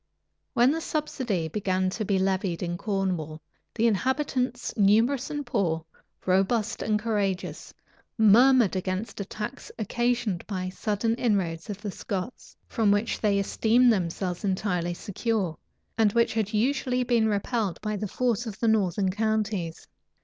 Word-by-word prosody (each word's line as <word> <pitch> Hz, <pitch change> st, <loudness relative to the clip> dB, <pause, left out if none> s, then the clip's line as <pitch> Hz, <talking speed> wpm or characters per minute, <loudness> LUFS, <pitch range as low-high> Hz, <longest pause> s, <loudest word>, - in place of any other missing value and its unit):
When 245 Hz, +3 st, +5 dB
the 325 Hz, +2 st, -2 dB
subsidy 255 Hz, -, -2 dB
began 185 Hz, +1 st, 0 dB
to 215 Hz, -, -3 dB
be 200 Hz, -1 st, +1 dB
levied 190 Hz, -2 st, 0 dB
in 175 Hz, 0 st, -2 dB
Cornwall, 180 Hz, -6 st, -2 dB, 0.4 s
the 230 Hz, -, +1 dB
inhabitants, 255 Hz, +2 st, 0 dB
numerous 225 Hz, +6 st, +3 dB
and 295 Hz, -1 st, -4 dB
poor, 165 Hz, -4 st, -1 dB, 0.4 s
robust 200 Hz, +4 st, +1 dB
and 215 Hz, -1 st, +1 dB
courageous, 205 Hz, -4 st, -2 dB, 0.5 s
murmured 230 Hz, 0 st, +6 dB
against 185 Hz, +3 st, -3 dB
a -, -, -4 dB
tax 215 Hz, +7 st, -6 dB
occasioned 235 Hz, -3 st, -1 dB
by 190 Hz, -3 st, -3 dB
a 185 Hz, -, -4 dB
sudden 210 Hz, +3 st, -1 dB
inroad 190 Hz, -9 st, 0 dB
of 205 Hz, +1 st, -6 dB
the 205 Hz, -, -3 dB
Scots, 195 Hz, +5 st, -6 dB
from 225 Hz, -4 st, +1 dB
which 205 Hz, +3 st, +1 dB
they 205 Hz, -2 st, +2 dB
esteemed 230 Hz, +4 st, +3 dB
themselves 180 Hz, -1 st, -2 dB
entirely 180 Hz, -3 st, -1 dB
secure, 200 Hz, -3 st, -2 dB, 0.4 s
and 210 Hz, -2 st, +4 dB
which 235 Hz, 0 st, +2 dB
had 215 Hz, -2 st, -1 dB
usually 250 Hz, +2 st, +1 dB
been 235 Hz, -2 st, +2 dB
repelled 210 Hz, -1 st, -1 dB
by 215 Hz, 0 st, -2 dB
the 210 Hz, +1 st, -3 dB
force 240 Hz, +2 st, -1 dB
of 215 Hz, -1 st, -7 dB
the 230 Hz, -, +1 dB
northern 195 Hz, -3 st, +2 dB
counties. 210 Hz, -5 st, -1 dB
210 Hz, 145 wpm, -27 LUFS, 190-235 Hz, 0.5 s, murmured